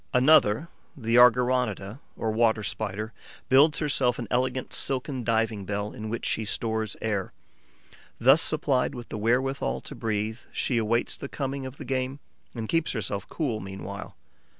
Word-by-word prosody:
Another, 130 Hz, 0 st, +5 dB, 0.3 s
the 115 Hz, -2 st, +1 dB
Argyroneta, 125 Hz, -3 st, +3 dB, 0.2 s
or 110 Hz, -, -1 dB
Water 110 Hz, -1 st, +2 dB
Spider, 105 Hz, +2 st, -3 dB, 0.4 s
builds 145 Hz, +4 st, +6 dB
herself 135 Hz, -5 st, +1 dB
an 120 Hz, -, -5 dB
elegant 130 Hz, +1 st, 0 dB
silken 130 Hz, -1 st, 0 dB
diving 110 Hz, -2 st, 0 dB
bell, 100 Hz, +2 st, -3 dB
in 110 Hz, 0 st, -6 dB
which 115 Hz, +1 st, -4 dB
she 110 Hz, -, 0 dB
stores 110 Hz, 0 st, -1 dB
air. 105 Hz, -4 st, -2 dB, 0.8 s
Thus 135 Hz, +7 st, +6 dB
supplied 140 Hz, -4 st, +1 dB
with 120 Hz, -1 st, -8 dB
the -, -, -4 dB
wherewithal 120 Hz, -, 0 dB
to -, -, -8 dB
breathe, 110 Hz, +1 st, -2 dB
she 120 Hz, -3 st, 0 dB
awaits 115 Hz, +2 st, 0 dB
the 140 Hz, -, -7 dB
coming 135 Hz, -1 st, -3 dB
of 130 Hz, +2 st, -10 dB
the -, -, -8 dB
game 130 Hz, +1 st, -2 dB, 0.4 s
and 115 Hz, -2 st, -4 dB
keeps 165 Hz, +3 st, +1 dB
herself 100 Hz, -4 st, -3 dB
cool 130 Hz, -9 st, -2 dB
meanwhile. 95 Hz, +1 st, -7 dB
115 Hz, 150 wpm, -27 LUFS, 110-130 Hz, 0.8 s, builds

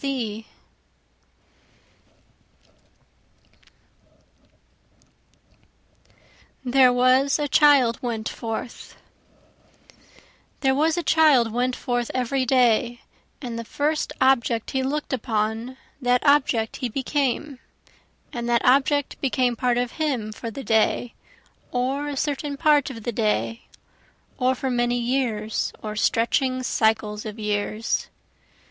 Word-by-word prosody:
There 255 Hz, 0 st, +5 dB
Was 255 Hz, +3 st, +3 dB
a 295 Hz, -1 st, -1 dB
Child 275 Hz, -5 st, +4 dB
Went 225 Hz, -3 st, -3 dB
Forth 225 Hz, +1 st, -6 dB, 1.7 s
There 265 Hz, -1 st, +3 dB
was 315 Hz, +4 st, +1 dB
a 345 Hz, -, -1 dB
child 295 Hz, -8 st, +4 dB
went 250 Hz, +2 st, 0 dB
forth 245 Hz, -2 st, -2 dB
every 255 Hz, +1 st, 0 dB
day, 240 Hz, -1 st, +2 dB, 0.4 s
And 235 Hz, -2 st, -5 dB
the -, -, -4 dB
first 300 Hz, +6 st, -1 dB
object 240 Hz, -3 st, +2 dB
he 265 Hz, -, 0 dB
look'd 285 Hz, +2 st, -3 dB
upon, 225 Hz, +1 st, -2 dB, 0.2 s
that 250 Hz, +1 st, +1 dB
object 265 Hz, -6 st, +2 dB
he 250 Hz, -, -3 dB
became, 275 Hz, +2 st, -2 dB, 0.7 s
And 240 Hz, -2 st, -4 dB
that 235 Hz, -1 st, +2 dB
object 280 Hz, +2 st, +2 dB
became 255 Hz, -3 st, +1 dB
part 245 Hz, +1 st, 0 dB
of 245 Hz, 0 st, -1 dB
him 250 Hz, -9 st, -1 dB
for 230 Hz, +2 st, -6 dB
the 270 Hz, +5 st, -7 dB
day 225 Hz, +1 st, +1 dB, 0.6 s
or 265 Hz, +4 st, -1 dB
a 285 Hz, -1 st, -4 dB
certain 285 Hz, 0 st, -2 dB
part 295 Hz, -2 st, +3 dB
of 230 Hz, -4 st, -9 dB
the 240 Hz, -, -2 dB
day, 225 Hz, +1 st, -1 dB, 0.7 s
Or 255 Hz, 0 st, +2 dB
for 260 Hz, +1 st, -3 dB
many 240 Hz, 0 st, +1 dB
years 235 Hz, -4 st, -1 dB
or 215 Hz, -1 st, -5 dB
stretching 255 Hz, +4 st, +1 dB
cycles 220 Hz, -3 st, 0 dB
of 215 Hz, 0 st, -7 dB
years. 210 Hz, +1 st, -2 dB
250 Hz, 105 wpm, -23 LUFS, 230-270 Hz, 1.7 s, There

